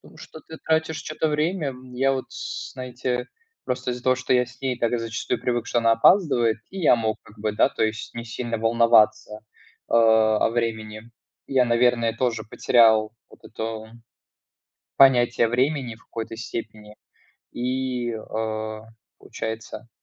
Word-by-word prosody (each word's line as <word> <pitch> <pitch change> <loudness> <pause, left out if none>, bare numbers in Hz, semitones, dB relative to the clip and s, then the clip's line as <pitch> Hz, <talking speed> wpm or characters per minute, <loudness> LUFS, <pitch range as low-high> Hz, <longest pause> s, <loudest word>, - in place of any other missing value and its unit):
Что 160 - -12
ты 160 - -9
тратишь 160 0 0
чьё-то 155 +1 -2
время. 150 -1 -1 0.2
Я 135 +2 +2
вот, 130 - -3 0.5
знаете, 125 -1 -4 0.4
просто 125 0 -2
из-за 125 0 -6
того, 130 0 +3
что 130 0 -1
я 125 0 +3
с 125 +1 -17
ней 130 -2 -1
так 120 +1 +1
зачастую 115 0 -3
привык, 120 -2 -1
что - - -1
она 115 0 +3
опаздывает, 120 - +4
и 195 - -6
я 160 - +5
мог, 110 -2 -1
как 105 - -18
бы, 105 0 -1
да, - - +3
то - - -2
есть 110 0 -3
не 115 0 -6
сильно 115 0 -4
волноваться, 110 -2 +3 0.5
э, - - -5
о 110 -2 +4
времени. 115 -1 -4 0.4
Я, 130 -2 +3
наверное, 120 -1 +2
тоже 115 -2 -1
потерял 110 -1 +3 0.2
вот - - -19
эту 110 0 -6 1.1
понятие 120 -3 +5
времени 130 0 0
в 115 - -24
какой-то 115 0 -6
степени, 110 -2 -7 0.6
и, 125 -1 -2
э, 110 0 -4 0.4
получается 110 +1 -7
115 Hz, 145 wpm, -24 LUFS, 110-130 Hz, 1.1 s, я